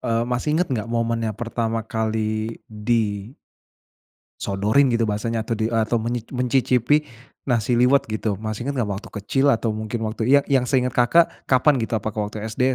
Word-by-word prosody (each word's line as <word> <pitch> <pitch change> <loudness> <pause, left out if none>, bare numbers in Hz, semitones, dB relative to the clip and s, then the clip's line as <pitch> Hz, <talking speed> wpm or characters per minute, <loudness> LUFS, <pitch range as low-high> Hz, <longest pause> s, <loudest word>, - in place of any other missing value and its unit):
e - - -4 0.2
masih 125 +4 -1
inget 180 - +1
nggak 115 -2 -2
momen 115 0 0
yang 105 - -5
pertama 115 -1 -2
kali 110 0 -2 0.5
di 105 +2 -3 1.5
sodorin 110 +7 +2
gitu 115 -1 +1
bahasanya 115 +2 -1
atau 115 - 0
di 110 - -1
e - - +1
atau 120 +2 0
menyi 120 +2 -1
mencicipi 125 +1 +2 0.5
nasi 120 -1 +1
liwet 135 +3 +5
gitu. 110 0 -2 0.2
Masih 110 +1 -3
inget 140 - -1
nggak 115 -5 -1
waktu 100 - -8
kecil 135 +7 0
atau 115 0 -1
mungkin 110 +2 -4
waktu 110 +1 -4
ya 140 - +7
yang 130 -2 +3
seinget 125 -2 +1
Kakak 165 +8 +6 0.2
kapan 135 +3 +4
gitu? 110 - -4
Apakah 110 0 -3
waktu 105 - -8
SD? 110 +3 -3
115 Hz, 180 wpm, -22 LUFS, 110-125 Hz, 1.5 s, ya